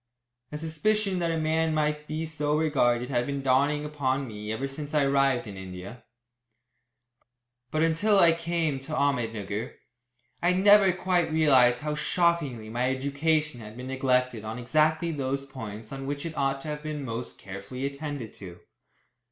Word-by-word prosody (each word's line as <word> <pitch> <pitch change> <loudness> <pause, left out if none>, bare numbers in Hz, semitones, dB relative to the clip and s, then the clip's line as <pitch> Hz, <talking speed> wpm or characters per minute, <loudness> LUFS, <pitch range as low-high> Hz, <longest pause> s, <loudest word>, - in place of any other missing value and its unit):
A 150 - -4
suspicion 185 +5 0
that 170 -1 0
a 165 - 0
man 160 0 +1
might 150 0 0
be 155 +1 -3
so 150 -1 -1
regarded 125 -6 +2
had 120 -1 0
been 140 -1 -3
dawning 140 +3 +2
upon 140 -2 -1
me 105 -1 -6
ever 130 +5 -2
since 145 +2 -6
I 150 - +4
arrived 135 -3 +2
in 100 -3 -8
India; 95 +5 -9 1.7
but 155 +4 +1
until 190 +6 +3
I 170 -3 +7
came 165 -3 -1
to 135 +4 -8
Ahmednugger 115 -8 -1 0.7
I 175 +1 +3
had 185 +1 0
never 205 -2 +7
quite 180 -2 0
realised 130 -6 +4
how 150 0 -2
shockingly 150 - 0
my 120 +3 0
education 140 +1 0
had 110 +1 -10
been 125 - -7
neglected 125 -3 +1
on 110 +1 -5
exactly 155 +6 +1
those 140 -2 -2
points 110 -5 -8
on 135 0 -6
which 145 +2 -3
it 165 - -5
ought 135 0 0
to 155 - -6
have 150 0 -4
been 150 -2 -5
most 115 0 -5
carefully 100 +7 -6
attended 140 -4 -5
to. 90 -3 -11
140 Hz, 165 wpm, -27 LUFS, 125-155 Hz, 1.7 s, I